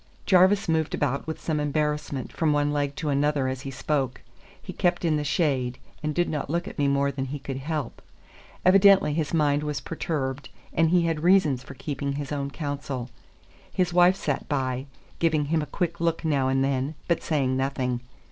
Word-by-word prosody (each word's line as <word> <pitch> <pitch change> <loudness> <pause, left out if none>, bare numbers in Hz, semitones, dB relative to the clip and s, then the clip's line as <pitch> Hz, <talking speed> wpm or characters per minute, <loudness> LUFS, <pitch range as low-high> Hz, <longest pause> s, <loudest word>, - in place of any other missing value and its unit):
Jarvis 190 +2 +5
moved 160 -2 +1
about 140 0 -1
with 160 - -4
some 155 -2 -1
embarrassment 150 -2 -1
from 160 -2 +1
one 145 0 +1
leg 145 -1 -1
to 155 0 -3
another 145 -1 +1
as 130 0 -3
he 135 - -6
spoke. 135 -1 -2 0.4
He - - -8
kept 175 0 +1
in 160 -2 +2
the 150 - 0
shade, 135 -5 0 0.2
and 155 -1 -2
did 175 0 +2
not 150 -3 -3
look 170 +4 -1
at - - -8
me 145 - +3
more 140 0 +2
than 135 -1 -3
he 140 +2 -4
could 135 -1 -5
help. 145 -1 -4 0.6
Evidently 195 -3 +6
his 155 -1 -1
mind 150 -3 +2
was 150 -2 -2
perturbed, 140 -4 -3 0.2
and 165 0 +3
he 175 0 +4
had 165 -2 0
reasons 170 -7 +4
for 135 +1 -11
keeping 140 +1 -3
his 140 0 -5
own 140 -1 -2
counsel. 140 -4 -4 0.6
His 180 -2 0
wife 180 +1 +6
sat 145 -7 -3
by, 130 -1 -1 0.3
giving 155 -3 +2
him 160 +2 +1
a 150 - -4
quick 170 +4 -2
look 165 0 0
now 140 -4 +2
and 135 0 +2
then, 135 +2 -1
but 170 - +1
saying 135 -5 0
nothing. 130 -2 -1
145 Hz, 195 wpm, -26 LUFS, 135-160 Hz, 0.6 s, Evidently